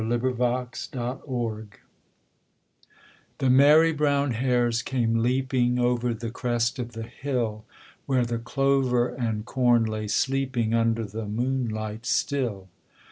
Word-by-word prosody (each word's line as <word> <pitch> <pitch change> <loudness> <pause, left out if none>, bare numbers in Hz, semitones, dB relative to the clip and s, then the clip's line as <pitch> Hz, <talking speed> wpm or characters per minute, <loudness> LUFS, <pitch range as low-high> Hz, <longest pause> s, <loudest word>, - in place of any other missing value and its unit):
THE 120 - +2
BAD 125 0 -1
SQUIRE 120 -3 -4 1.7
The 135 - +1
merry 150 +5 +6
brown 145 -2 +1
hares 120 -1 +1
came 115 -3 0
leaping 125 0 +1
Over 120 -1 +1
the 115 0 -5
crest 120 -1 -1
of 120 -1 -5
the 115 0 -6
hill, 115 -4 -3 0.4
Where 130 -3 +2
the 115 -1 -2
clover 130 0 +1
and 110 -4 -3
corn 120 -1 +3
lay 110 -1 -3
sleeping 130 -1 0
Under 115 0 +1
the 105 +2 -6
moonlight 110 -1 -2
still. 120 -9 -1
120 Hz, 120 wpm, -26 LUFS, 115-130 Hz, 1.7 s, merry